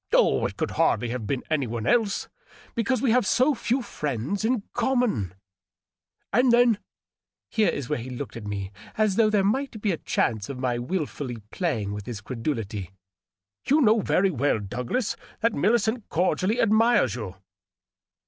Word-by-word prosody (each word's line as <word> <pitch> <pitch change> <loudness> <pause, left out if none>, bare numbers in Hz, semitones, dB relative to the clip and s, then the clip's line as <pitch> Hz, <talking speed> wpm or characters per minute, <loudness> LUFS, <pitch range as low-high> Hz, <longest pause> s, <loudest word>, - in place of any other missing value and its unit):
"Oh, - - +4
it - - -10
could - - -1
hardly 120 - +2
have 120 -3 -4
been 130 +2 -1
any 140 -5 +1
one 115 -1 -4
else, 225 -4 +2 0.2
— - - -22
because 255 +3 0
we 250 - +3
have 250 +2 +4
so 255 +8 +3
few 250 +1 0
firiiends 150 - -3
in 230 -2 +1
common. 215 - 0 1.0
And 245 +3 +4
then" 235 -3 +5 0.3
— - - -67 0.3
here 220 -2 +3
he 130 -2 -3
looked 130 +2 -6
at 110 -3 -7
me 100 -1 -4 0.3
as 215 -3 +2
though 220 0 +4
there 210 -2 +2
might 240 +3 0
be 205 -1 +1
a 165 - -1
chance 110 -6 -1
of 135 - -5
my 125 -2 -1
wilfully 140 -3 -3
playing 110 - -1
with 105 -1 -7
his 120 -4 -4
credulity—^ 110 - -4 0.4
" 95 0 -58
you 290 +4 +5
know 220 -5 +4
very 190 0 +2
well, 145 -4 +1
Douglas, 125 - -2 0.3
that 230 0 +2
Millicent 220 - +1
cordially 185 +6 +1
admires 220 - +4
you." 105 -5 -6
170 Hz, 165 wpm, -26 LUFS, -, 1.0 s, then